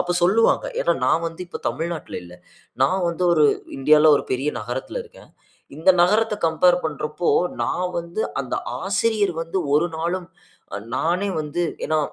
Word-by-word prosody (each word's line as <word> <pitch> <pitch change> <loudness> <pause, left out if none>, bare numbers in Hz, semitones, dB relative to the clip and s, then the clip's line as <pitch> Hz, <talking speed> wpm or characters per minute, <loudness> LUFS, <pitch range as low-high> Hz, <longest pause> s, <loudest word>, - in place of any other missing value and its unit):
அப்ப 175 0 -2
சொல்லுவாங்க. 225 - +3 0.2
ஏன்னா, - - +2
நான் 165 - +2
வந்து 165 +1 -7
இப்ப - - -8
தமிழ்நாட்ல 160 +6 -4
இல்ல. 90 0 -13 0.5
நான் 185 +8 +2
வந்து 170 +2 -2
ஒரு, 155 -3 +4 0.3
இந்தியால, 150 +3 +6
ஒரு - - -3
பெரிய 130 +3 -1
நகரத்தில 125 - -5
இருக்கேன். 470 +2 -17 0.5
இந்த 165 +4 +5
நகரத்த 215 +4 +3
கம்பேர் 175 +2 +4
பண்றப்போ, 150 +2 -3 0.4
நான் 180 0 -1
வந்து 170 +5 -3 0.2
அந்த 130 - -4 0.3
ஆசிரியர் 200 0 +1
வந்து 165 +3 -3 0.2
ஒரு 155 +4 +3
நாளும், 175 +2 -2 0.5
அ - - -3 0.2
நானே 180 +7 0
வந்து 150 +4 -2 0.2
ஏன்னா 155 - +1
170 Hz, 155 wpm, -22 LUFS, 155-190 Hz, 0.5 s, இந்தியால